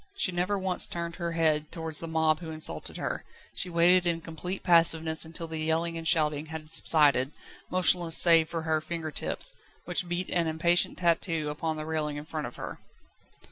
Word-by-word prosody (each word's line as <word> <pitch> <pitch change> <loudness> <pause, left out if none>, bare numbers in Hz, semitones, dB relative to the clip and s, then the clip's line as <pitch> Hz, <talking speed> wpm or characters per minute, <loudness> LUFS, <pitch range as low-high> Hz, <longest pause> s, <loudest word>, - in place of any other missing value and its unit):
She 225 - +1
never 180 +3 -1
once 185 -1 +1
turned 170 0 -5
her 170 -2 -3
head 155 -2 +1
towards 160 -2 -3
the 165 - -6
mob 160 -1 +1
who 165 - -8
insulted 155 0 -4
her. - - -4 0.3
She 180 - -4
waited 175 +1 +4
in 170 -1 0
complete 165 +4 -4
passiveness 165 -2 +3
until 165 +1 -7
the 160 -1 -5
yelling 160 +2 0
and 165 0 -3
shouting 155 -2 +2
had 155 0 -8
subsided, 145 -5 +4 0.4
motionless 175 -2 +2
save 165 -2 +6
for 165 -1 -4
her 160 -1 0
finger 160 -1 -5
tips, - - -2 0.3
which 180 +1 -1
beat 175 +1 -3
an 170 -2 +1
impatient 170 +2 +2
tattoo 165 -3 0
upon 155 +1 -3
the 155 - -5
railing 155 -2 -2
in 145 - -7
front 155 -2 -4
of 120 - -11
her. - - -7
165 Hz, 185 wpm, -28 LUFS, 155-170 Hz, 0.4 s, save